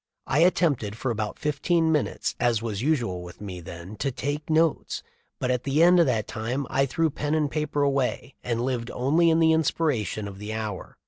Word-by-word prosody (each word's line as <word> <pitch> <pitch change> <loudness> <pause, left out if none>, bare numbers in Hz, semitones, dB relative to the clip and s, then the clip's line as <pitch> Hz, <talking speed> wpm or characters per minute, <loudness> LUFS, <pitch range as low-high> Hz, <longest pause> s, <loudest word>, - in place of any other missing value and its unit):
I 140 - +1
attempted 150 - +2
for 125 +1 -1
about 110 -2 -3
fifteen 160 +3 +1
minutes 150 -3 0
as 120 -2 +2
was 110 -3 -3
usual 120 - 0
with 90 0 -11
me 95 -4 -7
then 85 +4 -9
to 140 - -1
take 145 +5 -4
notes, 160 0 +1 0.4
but 125 - 0
at 125 -1 -1
the 145 +4 +3
end 175 +1 +6
of 170 - +5
that 110 -5 +1
time 125 +6 -3
I 135 +1 +2
threw 160 +4 +1
pen 145 +2 -1
and 150 -2 +1
paper 150 -1 -1
away 140 -1 0
and 120 -1 -1
lived 125 -2 -2
only 155 +7 +3
in 160 0 +3
the 160 -1 +5
inspiration 140 - 0
of 100 -1 -9
the 105 +1 -5
hour. 105 -4 -5
135 Hz, 200 wpm, -26 LUFS, 110-155 Hz, 0.4 s, end